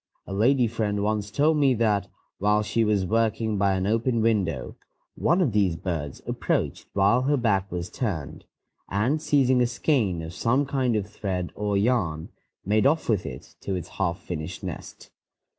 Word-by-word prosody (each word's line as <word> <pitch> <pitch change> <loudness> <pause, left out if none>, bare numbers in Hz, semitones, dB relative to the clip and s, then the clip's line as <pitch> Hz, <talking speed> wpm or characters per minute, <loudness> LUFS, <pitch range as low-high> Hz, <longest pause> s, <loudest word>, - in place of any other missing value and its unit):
A - - -7
lady 120 +5 +3
friend 105 -3 -1
once 105 -1 -1
told 150 +7 +2
me 135 -3 +4
that, 105 -3 +1 0.3
while 105 +1 +2
she 115 +2 +1
was 105 -3 +1
working 110 0 0
by 100 -1 +3
an 95 0 -1
open 115 +3 +1
window, 100 - 0 0.4
one 170 +4 +2
of 150 -9 +2
these 100 -5 +2
birds 80 -5 -4
approached - - -2
while 100 +5 +3
her 145 +3 +2
back 100 -6 +1
was 85 0 -3
turned, 80 - -4 0.4
and, 125 +10 +1
seizing 130 -4 +3
a 120 - +3
skein 120 - 0
of 80 +1 -7
some 130 +8 +1
kind 130 -4 0
of 105 -3 0
thread 95 -4 -4
or 105 -1 -1
yarn, 100 -8 0 0.4
made 105 +5 +3
off 155 +3 +1
with 105 -6 +1
it 65 - -9
to 95 - -2
its 90 -2 -5
half 90 -3 -1
finished 85 -4 -6
nest. - - -8
105 Hz, 175 wpm, -25 LUFS, 95-120 Hz, 0.4 s, me